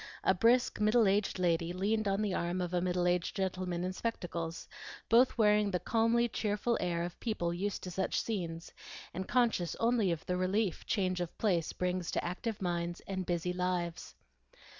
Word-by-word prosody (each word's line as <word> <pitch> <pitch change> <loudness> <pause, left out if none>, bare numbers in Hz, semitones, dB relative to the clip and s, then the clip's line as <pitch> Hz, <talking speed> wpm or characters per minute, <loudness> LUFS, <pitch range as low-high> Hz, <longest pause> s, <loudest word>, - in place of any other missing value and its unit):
A - - +4
brisk 235 +6 +3
middle 215 +1 +4
aged 200 +1 +1
lady 170 -1 +1
leaned 210 +3 0
on 195 +2 +1
the 200 -3 0
arm 175 +1 -1
of 180 -1 -3
a 175 - +2
middle 180 0 0
aged 180 0 +1
gentleman 185 -2 -2
in 185 +1 -2
spectacles, 170 -6 -4 0.4
both 245 +3 +5
wearing 210 -2 +4
the 180 -2 0
calmly 230 +3 +2
cheerful 215 +1 0
air 170 -1 0
of 175 0 -6
people 175 -7 -1
used 195 +3 -3
to 180 - -5
such 190 +2 0
scenes, 170 -6 -4 0.4
and 190 +1 -4
conscious 235 -9 +1
only 230 -5 +2
of 165 -2 -3
the 180 - -1
relief 185 +1 0
change 185 -3 0
of 175 - -5
place 180 -7 +1
brings 180 -1 -2
to - - -1
active 195 +4 -3
minds 175 -1 -2
and 190 -2 -4
busy 175 0 -1
lives. 180 -2 -2
185 Hz, 180 wpm, -32 LUFS, 175-210 Hz, 0.4 s, both